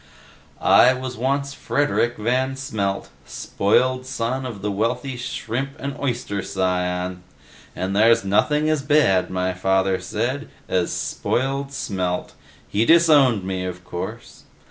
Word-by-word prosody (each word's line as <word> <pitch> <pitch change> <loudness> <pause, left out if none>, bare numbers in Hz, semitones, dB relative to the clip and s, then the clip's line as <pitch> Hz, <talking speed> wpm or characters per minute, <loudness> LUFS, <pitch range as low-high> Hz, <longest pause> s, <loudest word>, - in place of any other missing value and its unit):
"I 130 - +6
once 130 0 -5
was 140 +3 -1
Frederik 140 -6 0
Van 130 +4 0
Smelt, 100 -7 -3
spoiled 130 +5 0
son 130 +1 -2
of 105 -6 -8
the 105 - -1
wealthy 115 +6 -1
shrimp 125 +2 -4
and 140 0 -5
oyster 120 -7 -2
scion. 90 -1 -2 0.5
And 95 +2 -2
there's 115 +1 +4
nothing 150 +10 +2
as 155 -2 +1
bad, 140 -11 +3
my 95 0 -1
father 95 +1 +1
said, 120 +10 -3 0.2
as 90 -2 0
spoiled 135 +2 -2
Smelt. 90 -8 -3 0.3
He 105 +2 +1
disowned 145 - +5
me, 95 -1 -3
of 90 0 -6
course. 85 - -7
115 Hz, 125 wpm, -22 LUFS, 95-135 Hz, 0.5 s, I